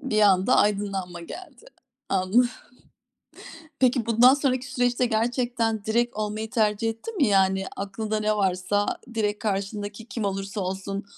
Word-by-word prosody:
Bir 240 -7 0
anda 190 -2 +4
aydınlanma 195 -4 0
geldi. 370 - -11 0.4
Anladım. 195 +6 +3 1.3
Peki 250 -3 +2
bundan 240 +3 +6
sonraki 260 -3 0
süreçte 245 -1 +1
gerçekten 230 -1 0
direkt 235 +1 0
olmayı 215 +1 -3
tercih 220 -2 +1
ettin 310 - -6
mi? 285 - +3
Yani, 190 -1 +3
aklında 215 +2 -3
ne 215 0 +1
varsa 195 +1 0 0.3
direkt 210 -2 0
karşındaki 205 +1 -3
kim 235 -5 -4
olursa 195 +1 -3
olsun 195 +2 -4
215 Hz, 130 wpm, -25 LUFS, 195-240 Hz, 1.3 s, bundan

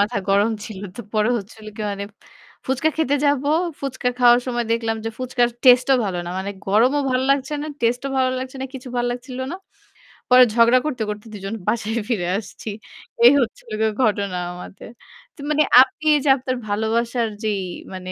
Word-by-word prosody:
মাথা 210 +2 +1
গরম 200 +3 +3
ছিল। 215 -3 -8 0.2
তো - - -5
পরে 215 +2 +2
হচ্ছিল 215 +1 -12
কি 220 - -4
মানে 200 0 -4 0.6
ফুচকা 270 +4 +1
খেতে 290 -3 +1
যাবো। 285 -1 +1 0.3
ফুচকা 260 -2 -2
খাওয়ার 240 -1 +6
সময় 240 -1 -1
দেখলাম 225 -1 -1
যে, 225 - -2
ফুচকার 250 -1 +1 0.2
টেস্টে 250 +1 +6
ও - - 0
ভালো 185 -2 -3
না। - - -4
মানে 195 +1 -3 0.2
গরমও 240 +9 +3
ভাল 255 0 +1
লাগছে 275 +1 +1
না। - - -4
টেস্টে 240 +3 0
ও - - -6
ভালো 260 -1 +2
লাগছে 260 +1 -6
না। - - -2
কিছু 260 -1 -8
ভাল 240 - 0
লাগছিল 250 +1 -6
না। - - -4 0.7
পরে 250 0 +8
ঝগড়া 235 +2 +5
করতে, 275 -6 -3
করতে 210 +1 -6
দুজন 195 0 -6
বাসায় 220 +1 0
ফিরে 195 -8 -1
আসছি। 215 +1 -8 0.6
এই 245 - +10
হচ্ছিল 235 -2 -4
গিয়ে 220 0 +2
ঘটনা 200 -4 0 0.2
আমাদের। 180 +4 -10 0.5
তো - - -26
মানে 305 0 +3 0.2
আপনি 305 +4 0 0.2
যে - - +3
আপনার 255 0 -3
ভালোবাসার 230 +3 0 0.2
যেই 210 -3 0 0.3
মানে 185 0 -7
240 Hz, 185 wpm, -21 LUFS, 210-255 Hz, 0.7 s, এই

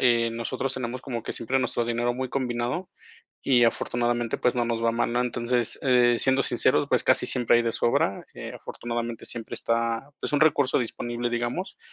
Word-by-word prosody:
eh, 115 -2 +3
nosotros 125 +3 -3
tenemos 130 0 -4
como 120 -4 -5
que - - -5
siempre 125 +3 -1
nuestro 120 -2 -1
dinero 120 +1 0
muy 130 0 -3
combinado 125 +6 -2 0.5
y 125 -3 +4
afortunadamente, 120 0 0
pues, 125 - +1
no 120 -1 0
nos 115 -1 -2
va 115 - +3
mal, 120 0 0
¿no? 120 +1 +1
Entonces, 120 -1 0
eh, 125 -3 +4
siendo 135 0 +3
sinceros, - - +2
pues - - +2
casi - - +3
siempre 120 -1 +3
hay 120 - +3
de 115 - 0
sobra, 105 -4 +1
eh, - - -7
afortunadamente 120 -1 -5
siempre 115 -2 -5
está, 115 +4 -1
pues, - - -3
un 145 0 +1
recurso 145 -4 +4
disponible, 120 0 -3
digamos. 120 +10 -3
120 Hz, 185 wpm, -26 LUFS, 115-130 Hz, 0.5 s, y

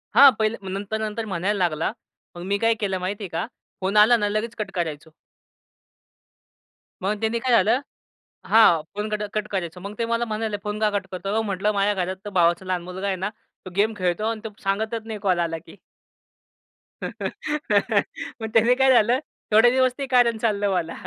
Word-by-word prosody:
हां, 280 -1 +10
पहिले. 220 +1 +1
मग 190 - -6
नंतर, 200 +3 -3
नंतर 220 +1 -3
म्हणायला 195 +1 -1
लागला. 170 -3 0 0.4
मग 175 - -8
मी 200 - +3
काय 230 +2 +3
केलं 195 -3 -1
माहितीये 195 +2 -4
का, 165 - -2 0.4
फोन 195 +3 0
आला 220 +3 +7
ना 205 -2 0
लगेच 215 +3 -2
कट 210 -2 -4
करायचो. 160 -3 -4 1.9
मग 200 +3 0
त्यांनी 225 +2 0
काय 255 +2 -1
झालं? 225 +3 +4 0.7
हां, 195 -8 +6
फोन 210 +1 -3
कट, 210 0 -2
कट 215 -1 -1
करायचो. 180 -3 -3
मग 200 +3 -7
ते 230 - 0
मला 230 +1 0
म्हणाले, 215 -1 -2
"फोन 210 0 -3
का 215 -1 +3
कट 205 -2 -2
करतोय?" 185 +2 -4
"अहो" 220 +1 +1
म्हटलं, 205 0 0
"माझ्या 200 0 +1
घरात 190 +3 -6
भावाचा 175 0 +3
लहान 185 -1 -2
मुलगा 185 +2 -5
आहे 195 -1 0
ना, 190 +3 -3 0.4
तो - - -6
गेम 210 +2 +3
खेळतो 180 +2 0
आणि 225 -1 -4
तो 220 - -4
सांगतच 220 +3 -2
नाही 220 -2 -5
कॉल 185 -3 +2
आला 165 -1 -1
की." 165 - -14 1.3
मग - - -6 1.3
त्याने 230 +2 +5
काय 265 0 +4
झालं, 240 +1 +4 0.3
थोडे 225 +3 +6
दिवस 255 0 +3
ते 275 - -1
कारण 235 -2 +4
चाललं 205 -2 0
मला. 170 -3 -1
210 Hz, 185 wpm, -24 LUFS, 185-220 Hz, 1.9 s, हां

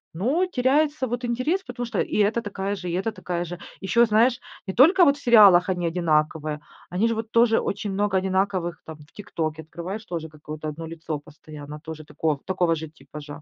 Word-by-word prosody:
Но 260 - +1
теряется 290 0 +1
вот 245 0 -4
интерес, 255 +10 0
потому 245 -1 -5
что 235 - -3
и - - -2
эта 210 +3 +2
такая 200 -1 -3
же, 180 -2 -6
и - - -3
эта 190 +5 -1
такая 180 -3 -4
же. 175 +1 -7 0.2
Ещё, 235 +5 +3
знаешь, 230 +3 +3 0.3
не 190 - -4
только 350 - +6
вот 280 -2 +4
в - - -14
сериалах 200 -7 +7
они 180 -2 -1
одинаковые, 155 -3 0 0.3
они 190 +6 +1
же 230 - +1
вот 225 0 -4
тоже, 230 -1 +4
очень 205 0 -3
много 205 0 +1
одинаковых 190 -2 -1
там, 160 -1 -9
в 150 +1 -18
"ТикТоке" 160 -6 -4
открываешь, 180 +7 -7
тоже 165 -2 -4
какое-то 155 0 -8
1 160 +2 -6
лицо 160 -2 -5
постоянно 150 0 -11
тоже 155 0 -9
тако 150 0 -1
такого 180 -3 +1
же 160 0 -6
типажа. 145 0 -11
185 Hz, 195 wpm, -24 LUFS, 160-230 Hz, 0.3 s, сериалах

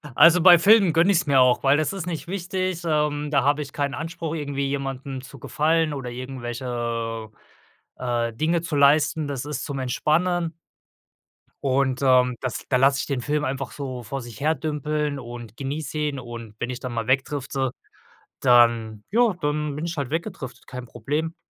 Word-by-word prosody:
Also, 165 +5 +7
bei 175 0 +9
Filmen 195 0 +5
gönne 170 +5 +4
ich's 175 -4 +2
mir 140 -2 +4
auch, 125 -1 +3
weil 135 +1 +5
das 155 +1 0
ist 195 -4 -4
nicht 165 -2 -4
wichtig, 185 -1 -2
ähm, 150 -1 0
da 145 - +3
habe 145 +2 +2
ich 140 - -7
keinen 140 -1 -1
Anspruch 165 +1 -4
irgendwie 140 -2 -2
jemanden 135 -1 -4
zu 135 +1 -12
gefallen 155 +4 +1
oder 135 -3 -5
irgendwelche, 120 -3 -4 0.7
äh, 120 -2 -1
Dinge 160 +7 0
zu 165 -3 -4
leisten. 145 +2 +4
Das 140 -2 -4
ist 145 -3 -4
zum 140 -2 -4
Entspannen 165 +6 0 1.1
und, 130 -1 +1
ähm, 125 -2 +4
das 130 -3 -4
da 130 - +3
lasse 135 +1 +4
ich - - -4
den 140 -3 -1
Film 150 +3 -1
einfach 135 -1 -3
so 130 -4 -6
vor 135 +5 -5
sich 120 -3 -10
her 155 +3 +2
dümpeln 150 0 -2
und 120 -2 -9
genieße 145 +3 -4
ihn 150 -2 -1
und 115 -3 -9
wenn 120 - -2
ich 125 -1 -4
dann 125 -1 -5
mal 115 -2 -3
wegdrifte, 135 0 0 0.7
dann 115 -4 +4
ja, 235 -1 +4
dann 150 -1 -1
bin 155 +3 -4
ich 170 - -3
halt 140 -5 -3
weggedriftet, 130 -5 -5
kein 125 -1 -8
Problem, 150 +9 -3
140 Hz, 180 wpm, -24 LUFS, 125-155 Hz, 1.1 s, bei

